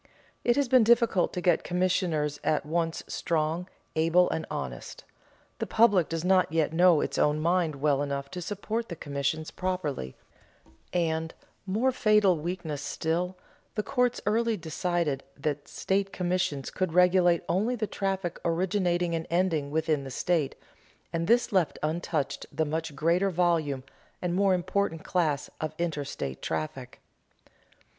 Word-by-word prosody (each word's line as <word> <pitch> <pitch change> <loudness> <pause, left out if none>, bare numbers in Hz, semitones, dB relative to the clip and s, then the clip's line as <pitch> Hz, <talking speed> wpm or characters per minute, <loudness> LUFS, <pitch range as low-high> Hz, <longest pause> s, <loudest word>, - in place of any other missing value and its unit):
It 240 - +3
has 285 -1 +2
been 255 -1 +6
difficult 230 -4 +3
to 180 - -3
get 175 -2 +3
commissioners 175 -5 0
at 150 -2 +1
once 165 +1 -1
strong, 165 +2 -1 0.3
able, 165 +3 +4
and 160 - -3
honest; 65 -3 -6 0.6
the - - -2
public 205 -7 +4
does 165 +1 -3
not 185 -3 +3
yet 160 -1 +1
know 175 -2 +5
its - - -2
own 150 +1 +3
mind 170 -1 +1
well 140 0 +1
enough 140 -1 -3
to 180 -1 -5
support 215 +5 -3
the 170 - -4
commissions 150 +1 -2
properly; 160 - -3 0.8
and 160 -2 -1 0.3
more 225 +8 +2
fatal 210 -6 +4
weakness 160 -3 -4
still 175 +5 -2 0.4
the 210 - 0
courts 250 -1 +1
early 225 +1 +1
decided 160 -3 -1
that 145 0 -3
state 195 0 -1
commissions 180 -6 -1
could 185 -3 -2
regulate 180 -1 +4
only 210 +8 +1
the 220 -2 -1
traffic 195 -4 -2
originating 175 0 +1
and 165 0 -2
ending 170 -5 +1
within 155 -1 0
the 135 - -7
state, 155 +2 0 0.6
and 165 0 -1
this 240 +1 +3
left 185 -5 +1
untouched 155 -2 -2
the 160 - 0
much 160 0 -3
greater 170 +6 +2
volume 165 -7 +1 0.4
and 175 -1 -2
more 195 0 +3
important 180 -2 -1
class 155 -6 0
of 155 0 -3
interstate 145 - -3
traffic. 80 -1 -4
170 Hz, 145 wpm, -28 LUFS, 155-185 Hz, 0.8 s, been